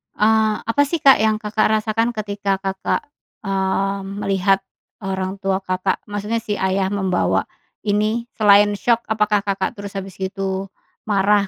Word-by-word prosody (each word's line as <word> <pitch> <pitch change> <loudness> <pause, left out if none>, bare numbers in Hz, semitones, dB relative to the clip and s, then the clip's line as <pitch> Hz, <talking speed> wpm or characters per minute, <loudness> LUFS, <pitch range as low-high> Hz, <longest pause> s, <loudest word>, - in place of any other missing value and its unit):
Eee, 220 0 +3
apa, 230 +5 +1
sih, 335 +3 -1
Kak 270 -1 +8
yang 220 0 +3
Kakak 215 +1 +1
rasakan 220 +2 +1
ketika 200 -2 -1
Kakak, 195 0 -1 0.4
eee, 195 0 0 0.2
melihat 195 0 +2 0.4
orang 190 0 -2
tua 190 0 0
Kakak, 185 0 -1
maksudnya 210 +2 -2
si 210 -2 -3
ayah 190 0 0
membawa 190 -2 +1 0.4
ini? 215 +3 0
Selain 205 -1 +6
syok, 235 +3 +1
apakah 210 -2 +2
Kakak 200 +4 -2
terus 200 -1 -8
habis 195 -1 -6
gitu 190 0 -3 0.4
marah 200 0 +3
200 Hz, 140 wpm, -20 LUFS, 195-215 Hz, 0.4 s, Kak